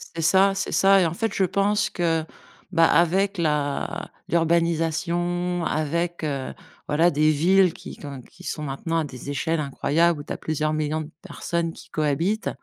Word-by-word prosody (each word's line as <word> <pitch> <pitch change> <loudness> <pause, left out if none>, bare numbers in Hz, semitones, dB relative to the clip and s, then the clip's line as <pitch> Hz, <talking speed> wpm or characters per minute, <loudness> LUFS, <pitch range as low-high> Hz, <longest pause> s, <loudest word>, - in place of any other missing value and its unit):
C'est 165 - -2
ça, 195 +4 +4
c'est 195 - -3
ça. 195 0 +5
Et - - +3
en 165 - -1
fait, 225 +2 -2
je 195 - +1
pense 200 +3 +1
que, 165 -2 0 0.5
bah, 165 -2 +5
avec 190 +4 +2
la 150 -3 -1 0.2
l'urbanisation, 170 +1 0
avec, 170 +3 -1
heu, 140 -3 -3 0.3
voilà 165 +4 +3
des 155 +1 +3
villes 180 +4 +4
qui - - -10
qui - - -11
ont 140 -3 -7
qui 180 +8 -18
sont 155 - -4
maintenant 165 +4 -2
à - - 0
des 135 -1 -8
échelles 160 +3 -1
incroyables 150 +3 +1
où - - -9
tu - - -10
as - - -2
plusieurs 155 0 -1
millions 155 +1 -1
de 155 - -9
personnes 170 -1 -3
qui - - -14
cohabitent. 165 +8 0
165 Hz, 180 wpm, -24 LUFS, 155-175 Hz, 0.5 s, ça